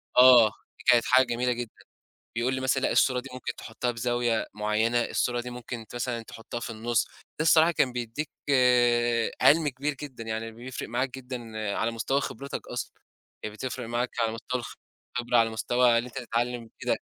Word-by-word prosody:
آه، 125 -3 +9
دي - - -14
كانت 120 -1 +4
حاجة 130 +1 +5
جميلة 120 +1 0
جدًا. 120 -2 -5 0.6
يقول 120 +3 0
لي 130 - -2
مثلًا 130 0 +1
لأ، - - +1
الصورة 130 -2 +3
دي 130 +2 -9
ممكن 130 - -4
تحطها 120 +2 -3
بزاوية 120 -1 0
معيّنة. 110 +3 +1
الصورة 120 -1 0
دي 125 - -7
ممكن 120 -2 -7
مثلًا 120 -1 -2
تحطها 115 +1 -7
في - - -5
النُص. 115 +1 0
ده - - -26 0.3
الصراحة 160 +1 +5
كان 135 -6 +1
بيديك 125 +5 -4 1.1
عِلْم 155 0 +6
كبير 140 +2 -2
جدًا، 130 -6 -7
يعني 110 0 -4
بيفرِق 120 +3 -7
معاك 130 +3 0
جدًا 130 -1 -6 0.4
على 115 +1 0
مستوى 135 +5 0
خبرتك 140 0 -6
أصلًا، - - -4 0.5
كانت 105 0 -5
بتفرِق 125 -1 -5
معاك 120 +2 -1
على 115 -1 +1
مستوى 120 +2 -3 0.5
الخبرة 120 0 +1
على 115 -1 +4
مستوى 120 +2 +3
اللي 120 - -1
أنت 125 - -10
تتعلم 120 0 -1
وكده. 115 - -3
120 Hz, 175 wpm, -27 LUFS, 115-130 Hz, 1.1 s, آه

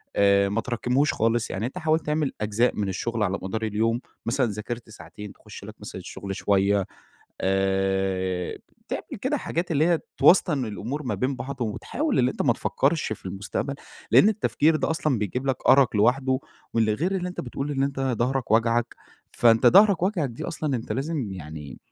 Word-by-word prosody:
آآ، 100 0 +4
ما 110 +3 0
تراكمهوش 125 +5 0
خالص، 115 +1 +1
يعني 105 +4 -2
أنت 135 +8 -5
حاولت 160 -1 +1
تعمل 150 -2 0
أجزاء 110 +4 +1
من 100 -2 -1
الشغل 115 +3 -2
على 100 0 -1
مدار 110 +4 -4
اليوم، 115 +3 0 0.2
مثلًا 130 +2 +1
ذاكرت 110 +3 -6
ساعتين، 100 +1 -10
تخش - - -12
لك - - -9
مثلًا - - -8
الشغل 95 -1 -6
شوية، 100 -1 +2 0.6
آآ، 95 -1 0 0.3
تعمل - - -5
كده - - 0
حاجات 170 +1 -3
اللي 155 +1 +3
هي 170 -2 +3 0.2
توسطن 150 -8 +5
الأمور 115 +7 -4
ما 125 - -2
بين 130 +1 -1
بعض، 130 +1 -6
وتحاول 245 - -2
اللي 125 0 +3
أنت - - -3
ما 120 - +4
تفكرش 140 +1 0
في 95 - -8
المستقبل، 100 +8 -3 0.4
لأن 205 - +7
التفكير 165 -7 +2
ده - - -1
أصلًا 155 -6 0
بيجيب 125 +6 -3
لك 130 - +1
أرق 130 -5 +5
لوحده، 130 +4 +3 0.4
واللي 110 -2 +3
غير 175 - -1
اللي 180 -1 -2
أنت 180 - -5
بتقول 135 +3 -4
إن 135 -1 0
أنت 140 -1 -1
ضهرك 130 -1 -1
واجعك، 115 +1 +2 0.4
فأنت 115 -1 +4
ضهرك 200 -2 +6
واجعك 185 -7 +1
دي 115 - -7
أصلًا 155 -5 -2
أنت 115 - -5
لازم 135 -6 -2
يعني 75 -6 -8
120 Hz, 180 wpm, -25 LUFS, 105-140 Hz, 0.6 s, لأن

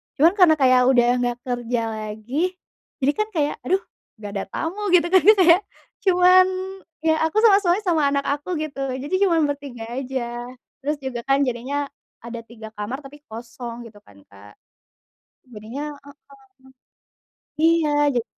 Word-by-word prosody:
cuman 325 +5 +5
karena 340 -4 +7
kayak 255 -1 +5
udah 245 -2 +4
gak 245 -1 -1
kerja 245 -2 -2
lagi, 215 +6 -4 0.6
jadi 280 - +4
kan 425 - +1
kayak 295 -2 0
aduh 380 +2 +2 0.4
gak 205 - -6
ada - - -3
tamu 360 +6 -3
gitu 345 -1 +3
kan 375 - +7
ya, 430 - +11
Kak, 370 -4 +3
ya, 345 - +6 0.5
cuman 365 0 +6 0.6
ya 320 - +3
aku 320 - -5
sama 410 -3 +7
suami 360 -1 +1
sama 340 -5 +1
anak 280 0 0 0.2
aku 355 +5 -5
gitu, 305 -3 -5 0.2
jadi 290 - -8 0.2
cuman 325 -4 +2
bertiga 275 -5 -8 0.2
aja, 240 -2 -5 0.3
terus 290 +3 -2
juga 255 -2 -4
kan 275 +1 +3
jadinya 270 +3 -3 0.3
ada 235 0 -7
3 225 -1 -12
kamar 220 +7 -6
tapi 280 +2 -12
kosong 235 +1 -8
gitu 220 -3 -14
kan, 100 - -20
Kak. 100 +1 -16 1.0
Jadinya 225 +6 -7 0.2
heeh. 285 - -14 1.5
Iya, 325 -2 +3 0.2
jadi 240 -2 0
275 Hz, 155 wpm, -22 LUFS, 235-325 Hz, 1.5 s, ya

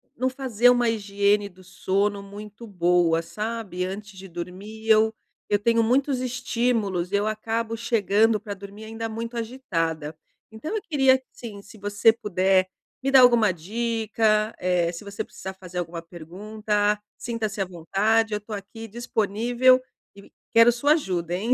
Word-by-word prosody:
não 255 +2 0
fazer 245 -3 +2
uma 245 -1 +3
higiene 205 -1 +1
do 185 0 -18
sono 200 +2 -1
muito 210 +3 -10
boa, 175 -3 +2
sabe. 210 -1 -4
Antes 200 +1 -7
de 195 - -9
dormir, 190 +6 -8
eu 220 0 +5 0.4
eu 205 - +4
tenho 230 +2 +2
muitos 260 +3 +2
estímulos 230 -7 -1
e - - +1
eu 205 +1 +1
acabo 225 +1 -2
chegando 225 -1 +2
para 210 -2 -6
dormir 200 +2 -11
ainda 225 +1 -5
muito 230 +2 -5
agitada. 165 - -3 0.4
Então 305 - -5
eu 430 - -1
queria 270 -5 +4
sim, 215 -4 -9
se 220 +1 -15
você 205 +2 +3
puder 190 -3 +2 0.3
me 270 - 0
dar 265 -1 +7
alguma 235 -5 +6
dica, 215 +3 0
eh, 180 -2 +1
se 170 - -8
você 200 0 -5
precisar 190 0 -8
fazer 180 -1 -7
alguma 170 -1 -5
pergunta, 205 +5 -2 0.2
sinta-se 225 -3 -3
à 195 - +1
vontade. 210 +6 +1
Eu - - 0
estou 210 +1 -7
aqui 225 +3 -9
disponível 240 +3 +2 0.3
e 200 - -15 0.2
quero 230 +1 +7
sua 260 +5 +1
ajuda, 180 - -2
hein. 220 +7 +1
210 Hz, 155 wpm, -25 LUFS, 190-230 Hz, 0.4 s, dar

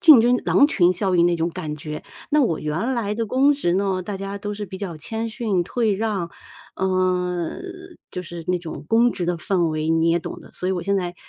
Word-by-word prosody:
竞 310 -9 +9
争， 245 +1 +4
狼 285 - +6
群 180 - +4
效 185 +1 0
应 170 0 +5
那 175 - +2
种 165 +1 0
感 150 -2 -5
觉。 150 0 -6 0.3
那 300 0 +4
我 165 -10 +1
原 170 +13 -1
来 210 -4 -1
的 225 +1 -2
公 270 +6 +4
职 180 -12 0
呢， 190 -1 0
大 200 +2 -4
家 195 +1 -5
都 205 +1 -4
是 205 0 -4
比 190 -1 -8
较 180 -6 -5
谦 225 +8 -4
逊、 220 -6 0
退 225 +3 0
让， 195 -5 -2 0.5
呃， 180 - 0 0.5
就 180 - -4
是 170 -1 -7
那 180 -1 +2
种 160 -3 -8
公 235 +1 +4
职 175 - -3
的 175 0 0
氛 180 +1 0
围， 155 +1 -1
你 165 0 +3
也 170 +1 +3
懂 - - -7
得， - - -15
所 180 - -4
以 190 - +1
我 180 -2 -2
现 200 0 +1
在 180 -2 -2
185 Hz, 250 characters per minute, -23 LUFS, 170-220 Hz, 0.5 s, 竞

